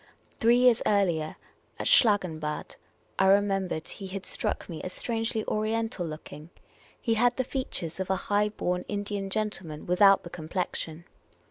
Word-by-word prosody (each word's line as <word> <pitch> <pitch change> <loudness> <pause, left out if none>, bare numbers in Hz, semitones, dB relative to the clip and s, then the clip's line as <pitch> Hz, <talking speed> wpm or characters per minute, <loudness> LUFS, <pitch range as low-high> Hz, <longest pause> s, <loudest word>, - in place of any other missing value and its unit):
Three 235 +2 +5
years 250 -2 +5
earlier, 175 -7 +1 0.4
at - - -4
Schlangenbad, 170 -9 +2 0.4
I 190 - +5
remem 195 -1 +3
bered, 155 -1 -4
he 195 - -7
had 190 0 -6
struck - - -2
me 165 -3 -6
as 185 - -5
strangely 225 -1 -2
Oriental 220 -3 -1
looking: 155 0 -9 0.5
he 230 - +1
had 240 +2 +3
the 260 - +1
features 240 - -4
of 190 - -3
a 190 - +3
high 205 +1 +2
born 180 -3 -2
Indian 205 -1 -3
gentleman, 190 -7 -3
without 195 +2 +5
the 175 - -9
complexion. 165 -1 -4
195 Hz, 150 wpm, -28 LUFS, 175-215 Hz, 0.5 s, Three